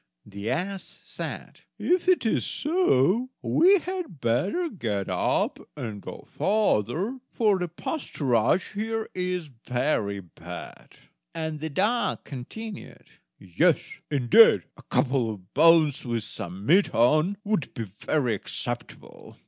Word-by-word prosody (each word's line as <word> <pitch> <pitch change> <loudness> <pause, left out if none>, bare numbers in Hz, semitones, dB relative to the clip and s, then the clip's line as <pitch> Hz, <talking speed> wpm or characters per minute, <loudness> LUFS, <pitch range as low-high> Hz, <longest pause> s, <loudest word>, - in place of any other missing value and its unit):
The 100 +2 -6
ass 190 +2 -3
said: - - -7 0.2
"If 360 0 +1
it 370 -8 +3
is 220 - +1
so, 255 - +2
we 380 +4 +5
had 360 - -5
better 135 - 0
get 110 - -3
up - - 0 0.2
and 110 -7 -5
go - - -9
farther, 200 - 0
for 210 -4 +2
the 180 - -1
pasturage 155 - 0
here 220 +1 -2
is 180 -2 -2 0.2
very 120 -6 0
bad"; 90 -4 -10 0.4
and 160 -1 -3
the 160 +1 -4
dog 210 +10 0
continued: 200 - -9 0.3
"Yes, 90 -3 +2 0.3
indeed! 145 - +6
a - - -15
couple 130 -4 +1
of 95 -4 -9
bones 160 -2 +5
with 115 -3 -2
some 95 -2 -5
meat 185 - +4
on 155 - +3
would 205 -9 -1
be 115 - -3
very 115 +5 -1
acceptable!" 100 - -5
160 Hz, 125 wpm, -26 LUFS, -, 0.4 s, indeed